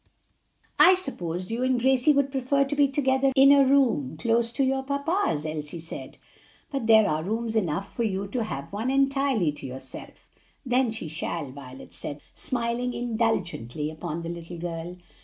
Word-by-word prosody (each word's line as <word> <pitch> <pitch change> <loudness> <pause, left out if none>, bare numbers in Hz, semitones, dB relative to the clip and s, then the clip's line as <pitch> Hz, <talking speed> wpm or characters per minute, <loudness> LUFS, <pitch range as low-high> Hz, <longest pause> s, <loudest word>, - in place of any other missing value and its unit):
"I 370 - +8
supposed 185 - -4
you 230 +2 -2
and 255 -1 +2
Gracie 265 +3 +4
would 280 -1 +2
prefer 270 +1 +1
to 280 +2 -3
be 285 -1 +4
together 270 -1 +2
in 275 0 +7
a 280 -1 +7
room 255 - +2
close 230 +4 +1
to 275 - +1
your 265 0 +1
papa's," 280 - -1
Elsie 155 +1 -4
said; 165 +1 -8 0.5
"but 270 -5 -2
there 220 -2 +6
are 155 -2 0
rooms 225 +5 -2
enough 195 -2 -1
for - - -2
you 200 -3 -1
to 235 +3 -1
have 140 -5 -6
one 220 +5 -2
entirely 275 - +2
to 145 -2 -7
yourself." 130 0 -10 0.4
"Then 250 -1 +2
she 220 -7 -5
shall," 160 -2 -4
Violet 130 -1 -11
said, 145 0 -5
smiling 245 -2 -2
indulgently 190 - -1
upon 165 +1 -5
the 165 - -5
little 170 0 -7
girl. 170 +1 -5
225 Hz, 170 wpm, -26 LUFS, 165-265 Hz, 0.5 s, I